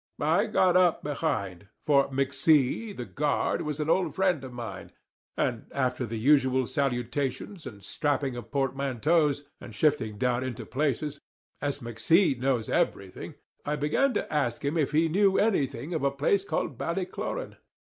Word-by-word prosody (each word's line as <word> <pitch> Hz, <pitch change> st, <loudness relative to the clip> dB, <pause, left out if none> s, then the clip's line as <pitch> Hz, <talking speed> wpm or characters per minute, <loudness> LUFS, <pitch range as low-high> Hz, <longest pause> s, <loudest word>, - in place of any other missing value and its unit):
I 165 Hz, +9 st, +2 dB
got 185 Hz, -4 st, +3 dB
up 180 Hz, -2 st, +4 dB
behind, 120 Hz, -, -2 dB, 0.2 s
for 140 Hz, -2 st, +4 dB
McC, 140 Hz, -, +1 dB
the 125 Hz, -, -4 dB
guard, 145 Hz, +3 st, 0 dB
was 150 Hz, 0 st, -4 dB
an 150 Hz, -, -1 dB
old 170 Hz, 0 st, +1 dB
friend 185 Hz, -7 st, +1 dB
of 130 Hz, -, -7 dB
mine; 120 Hz, -2 st, -7 dB, 0.4 s
and 120 Hz, -3 st, -1 dB
after 125 Hz, -2 st, -1 dB
the 115 Hz, +1 st, -4 dB
usual 130 Hz, +1 st, +3 dB
salutations 135 Hz, -, -2 dB
and 105 Hz, -5 st, -10 dB
strapping 140 Hz, +2 st, -1 dB
of 120 Hz, -, -8 dB
portmanteaus, 140 Hz, +2 st, +1 dB, 0.2 s
and 110 Hz, -, -10 dB
shifting 110 Hz, -7 st, +1 dB
down 125 Hz, +2 st, 0 dB
into 130 Hz, -3 st, -5 dB
places, 145 Hz, +1 st, -2 dB, 0.4 s
as 145 Hz, 0 st, -2 dB
McC 135 Hz, -, +3 dB
knows 125 Hz, -4 st, 0 dB
everything, 95 Hz, -2 st, -2 dB, 0.3 s
I 150 Hz, -, -1 dB
began 150 Hz, -, +1 dB
to -, -, -2 dB
ask 140 Hz, -3 st, -1 dB
him 145 Hz, +3 st, 0 dB
if 150 Hz, -4 st, +1 dB
he 160 Hz, +2 st, +3 dB
knew 195 Hz, +3 st, +3 dB
anything 150 Hz, -, 0 dB
of 160 Hz, -, -1 dB
a 140 Hz, -, +3 dB
place 145 Hz, +8 st, +1 dB
called 155 Hz, -, -3 dB
Ballycloran. 190 Hz, -, -3 dB
140 Hz, 155 wpm, -28 LUFS, 125-160 Hz, 0.4 s, up